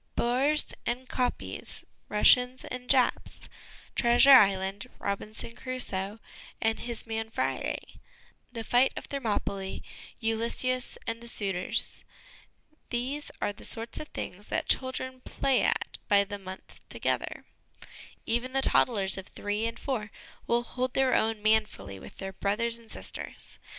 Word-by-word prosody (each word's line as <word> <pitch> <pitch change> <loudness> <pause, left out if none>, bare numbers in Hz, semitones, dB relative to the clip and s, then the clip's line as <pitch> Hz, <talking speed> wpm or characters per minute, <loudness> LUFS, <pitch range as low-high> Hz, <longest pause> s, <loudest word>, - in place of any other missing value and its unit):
Boers 270 +6 +3
and 250 +2 -2
kopjes, 250 -1 -3 0.3
Russians 250 +4 +4
and 250 0 -7
Japs, 260 -3 +2 0.5
Treasure 240 +3 +6
Island, 195 -5 +5
Robinson 215 +3 -4
Crusoe 220 -6 -1 0.4
and 225 0 +1
his 235 -2 -6
man 225 -1 -3
Friday, - - -3 0.5
the 230 -2 -5
fight 245 +4 +3
of - - -5
Thermopylae, 205 -7 -3 0.4
Ulysses 235 +3 0
and 230 +1 -3
the 235 - -10
Suitors 195 -5 0 0.9
these 260 +5 -2
are 205 - -1
the - - -13
sorts 230 0 +3
of 305 - -6
things 205 -6 -7
that - - -1
children 260 0 0
play 270 -2 +1
at - - 0
by 200 -1 +5
the 205 0 -6
month 190 -1 -10
together; - - -2 0.8
even 240 +3 -1
the 270 0 +2
toddlers 195 -8 +4
of 190 - -10
three 210 +2 -2
and 230 - -5
four 230 -6 -3 0.4
will 235 0 +2
hold 255 +1 -3
their 265 -1 +3
own 220 -1 +1
manfully 215 - +1
with - - -12
their 195 0 -5
brothers 230 +4 0
and 230 -1 -17
sisters. - - -3
230 Hz, 135 wpm, -29 LUFS, 205-255 Hz, 0.9 s, Treasure